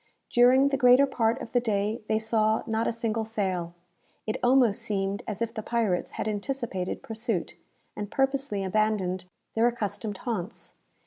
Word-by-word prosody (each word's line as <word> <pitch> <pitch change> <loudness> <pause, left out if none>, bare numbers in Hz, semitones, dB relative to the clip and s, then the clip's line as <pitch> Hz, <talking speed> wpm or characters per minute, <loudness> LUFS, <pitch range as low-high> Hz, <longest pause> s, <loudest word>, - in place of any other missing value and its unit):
During 255 +3 +6
the 275 - 0
greater 250 +1 +6
part 235 -2 0
of - - -9
the 245 - +3
day 215 0 -1
they 220 - +2
saw 220 0 +1
not 225 0 0
a - - +2
single 230 -1 -1
sail. 185 -6 -2 0.5
It 215 - -2
almost 245 -4 +4
seemed 195 -1 -1
as 215 +1 -2
if 230 0 -4
the 220 - -4
pirates 215 -6 -1
had - - -2
anticipated 210 -3 -3
pursuit, 225 -4 -3 0.4
and 205 -1 -5
purposely 270 -6 0
abandoned 190 -2 0 0.3
their 225 +1 +3
accustomed 215 -3 -3
haunts. 225 -4 -4
220 Hz, 155 wpm, -27 LUFS, 205-240 Hz, 0.5 s, During